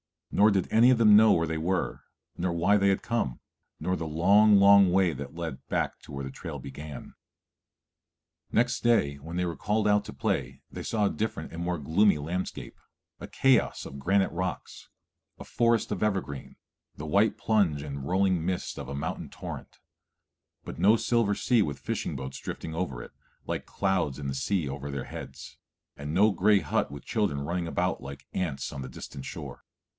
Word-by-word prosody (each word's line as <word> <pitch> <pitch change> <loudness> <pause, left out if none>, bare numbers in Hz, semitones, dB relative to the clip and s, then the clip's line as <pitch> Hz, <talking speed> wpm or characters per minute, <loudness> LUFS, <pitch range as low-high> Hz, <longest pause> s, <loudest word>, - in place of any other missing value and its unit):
Nor 105 +2 +5
did 95 -3 +1
any 115 +3 +6
of 130 - +5
them 105 -2 +7
know 110 0 +7
where 85 - +2
they 80 0 -3
were, 90 +3 -2 0.3
nor 90 0 -1
why 90 +5 +3
they 100 -1 +2
had 95 -1 +1
come, 115 - -2 0.4
nor 90 - 0
the 80 -3 -4
long, 100 +7 +5
long 100 -1 +7
way 95 -1 +3
that 70 +4 -8
led 80 -5 -6
back - - -1
to - - -14
where 70 0 -5
the 65 - -5
trail - - -7
began. 70 +1 -9 1.4
Next 125 +2 +2
day 95 -12 +2
when 80 +5 -8
they 90 0 0
were 85 -1 -4
called 105 +1 0
out 105 0 +3
to - - -8
play 65 0 -2
they - - -6
saw 105 -2 0
a - - +3
different 105 -7 -4
and 85 - -6
more 90 0 -1
gloomy 85 +6 +3
landscape, 85 +6 -5 0.4
a - - -7
chaos 135 -3 +2
of 70 - -8
granite 95 +7 +2
rocks, 90 +2 -5 0.5
a - - -9
forest 115 -2 +1
of 100 - -3
evergreen, 95 -10 -2 0.4
the 75 - -7
white 100 +7 +2
plunge 95 -10 +1
and 70 -2 -6
rolling 95 -1 +2
mist 90 +1 -3
of - - -6
a 70 - -5
mountain 70 - -4
torrent; - - -9 0.8
but - - -8
no 105 +3 +6
silver 115 -3 +1
sea 120 +1 +2
with 75 -8 -1
fishing - - -3
boats 65 0 -6
drifting 80 - -6
over 80 -8 -3
it, - - -12 0.3
like - - -3
clouds 95 -9 -1
in 70 -2 -5
the 70 - -2
sea 75 +5 -1
over 70 +1 -5
their 70 -1 -4
heads, - - -9 0.4
and 75 +1 -6
no 105 +5 +5
gray 100 +2 +4
hut - - 0
with 70 -1 -9
children 100 -11 0
running 85 +4 -2
about 90 +1 -1
like 70 0 -9
ants 80 -8 -2
on 70 - -6
the 65 - -6
distant 65 +1 -9
shore. - - -8
90 Hz, 190 wpm, -28 LUFS, 70-100 Hz, 1.4 s, them